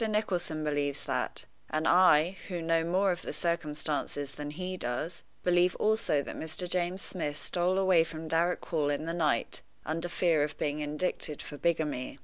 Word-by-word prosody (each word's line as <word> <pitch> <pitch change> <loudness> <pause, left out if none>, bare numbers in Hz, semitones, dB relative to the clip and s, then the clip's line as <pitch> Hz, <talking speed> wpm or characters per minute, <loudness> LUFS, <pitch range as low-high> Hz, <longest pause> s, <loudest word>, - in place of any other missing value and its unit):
Nicholson 180 -7 -1
believes 145 -2 0
that; - - -2 0.2
and 155 +1 0
I, 180 -1 +6
who 180 -3 -3
know 165 0 +2
more 185 +3 +2
of 175 - -3
the - - -5
circumstances 150 -3 -2
than 145 0 -6
he 185 +4 -4
does, 155 +4 -3 0.2
believe 180 0 +4
also 215 -9 +2
that - - -7
Mr. 160 +3 -3
James 180 +1 -1
Smith 150 -5 -3
stole 180 +3 0
away 185 -4 +5
from 160 0 -7
Darrock 170 +2 +1
Hall 150 -3 0
in 145 +2 -1
the 165 - -2
night 155 -8 +1 0.2
under 165 +3 -2
fear 170 -3 +2
of 145 0 -1
being 145 0 -1
indicted 150 0 -2
for 150 - -8
bigamy. 150 -5 -1
165 Hz, 170 wpm, -30 LUFS, 150-180 Hz, 0.2 s, I